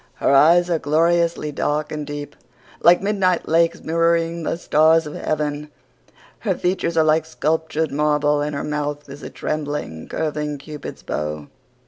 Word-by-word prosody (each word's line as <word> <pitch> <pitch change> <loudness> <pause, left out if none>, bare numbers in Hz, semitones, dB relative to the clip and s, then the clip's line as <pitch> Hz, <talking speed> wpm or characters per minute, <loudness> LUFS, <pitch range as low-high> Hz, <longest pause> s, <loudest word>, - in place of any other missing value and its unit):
Her - - +1
eyes 170 +5 +6
are 165 - +1
gloriously 165 +1 +1
dark 150 +1 -1
and 150 -1 -5
deep, 145 0 -6 0.5
like 175 +2 +5
midnight 195 -4 +1
lakes 165 +1 +2
mirroring 165 +1 +1
the 165 - -2
stars 160 0 +3
of 150 - -7
heaven. 150 -1 -3 0.7
Her - - -1
features 180 -2 -1
are 160 - +5
like 155 0 +2
sculptured 160 0 -1
marble 150 0 +1
and 150 0 -2
her 140 - -3
mouth 150 -1 -3
is 140 +1 -10
a - - -7
trembling, 145 - -4
curving 150 -2 -3
Cupid's 150 +1 -9
bow. 75 -1 -4
155 Hz, 150 wpm, -21 LUFS, 145-165 Hz, 0.7 s, eyes